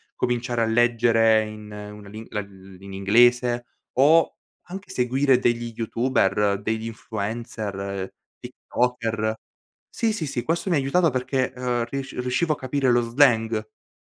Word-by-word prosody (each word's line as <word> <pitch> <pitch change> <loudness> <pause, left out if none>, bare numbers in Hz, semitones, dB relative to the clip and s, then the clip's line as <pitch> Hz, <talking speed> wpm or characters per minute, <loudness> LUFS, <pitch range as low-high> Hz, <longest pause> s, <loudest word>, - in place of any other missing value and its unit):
cominciare 120 -1 -1
a - - +2
leggere 115 -1 +3
in 105 -1 -10
una 105 0 -9
li 110 +2 -9
uhm, 95 -2 -8
in 100 0 -10
inglese 120 +5 +3 0.3
o 155 +5 +5 0.3
anche 190 +3 -9
seguire 130 +1 +2
degli 120 -1 0
youtuber, 105 -4 +1
degli 110 +2 -2
influencer, 105 -3 -5 0.3
tiktoker. 115 -3 -2 0.6
Sì, 225 -1 0
sì, 165 -8 -3
sì, 125 -3 -3
questo 170 +7 -1
mi 175 - +3
ha - - +2
aiutato 160 +6 +2
perché, 130 0 -1
uhm, 125 -2 -1
risc 135 +3 -5
riuscivo 125 +6 0
a - - -7
capire 130 0 0
lo 120 0 +4
slang 115 -2 +3
che 110 - -27
120 Hz, 140 wpm, -24 LUFS, 110-130 Hz, 0.6 s, o